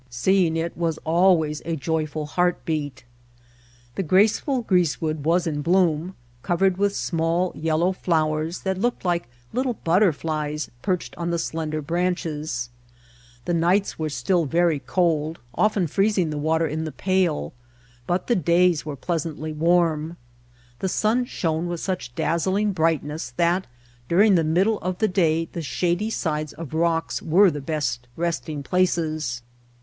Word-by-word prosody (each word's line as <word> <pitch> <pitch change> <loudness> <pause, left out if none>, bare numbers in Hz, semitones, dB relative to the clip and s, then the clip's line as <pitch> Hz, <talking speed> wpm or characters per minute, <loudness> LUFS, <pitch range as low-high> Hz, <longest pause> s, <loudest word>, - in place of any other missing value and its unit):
Seeing 165 +6 +2
it 165 +1 -2
was 165 -2 -1
always 160 -3 +3
a 165 +1 -2
joyful 155 0 -2
heart 175 +3 0
beat. 145 -5 -3 0.9
The - - -2
graceful 210 - +2
greasewood 160 -6 0
was 170 +2 +2
in 150 -3 -2
bloom, 175 +1 +1 0.3
covered 180 +3 +1
with 200 0 +1
small 170 +2 0
yellow 160 +3 +1
flowers 160 -2 -1
that 190 -1 -2
looked 240 -1 -1
like 175 -5 0 0.3
little 250 0 0
butterflies 155 -4 +1
perched 180 +2 -2
on 170 0 -2
the 170 - 0
slender 155 -2 -3
branches. 155 -6 -2 0.7
The 175 - 0
nights 175 +4 +1
were 155 -1 -1
still 175 +3 +1
very 165 0 +2
cold, 160 -1 0 0.2
often 210 +3 +2
freezing 195 0 +1
the 150 - -3
water 160 +2 +1
in 160 +1 -2
The - - -4
Mountain - - -12
Spring 185 0 +1
the - - +5
pail, 75 - -4 0.5
but 175 +1 0
the 240 - +2
days 170 -1 +3
were 150 -2 -5
pleasantly 155 +1 -3
warm. 165 0 +1 0.6
The 190 - -1
sun 225 +6 +1
shone 165 -6 -2
with 175 -1 -3
such 180 -11 -4
dazzling 190 +5 +1
brightness 155 -6 -1
that 175 +2 +2 0.4
during 200 +4 +5
the 170 -3 +4
middle 190 +7 +2
of 185 0 -3
the 220 - +2
day 165 -3 +1
the 170 - -3
shady 175 +7 -1
sides 155 -7 -2
of 160 -3 -8
rocks 165 0 0
were 180 +4 +5
the 145 -1 -5
best 135 -5 -2
resting 165 -3 -2
places. 155 -7 0
165 Hz, 150 wpm, -24 LUFS, 155-180 Hz, 0.9 s, the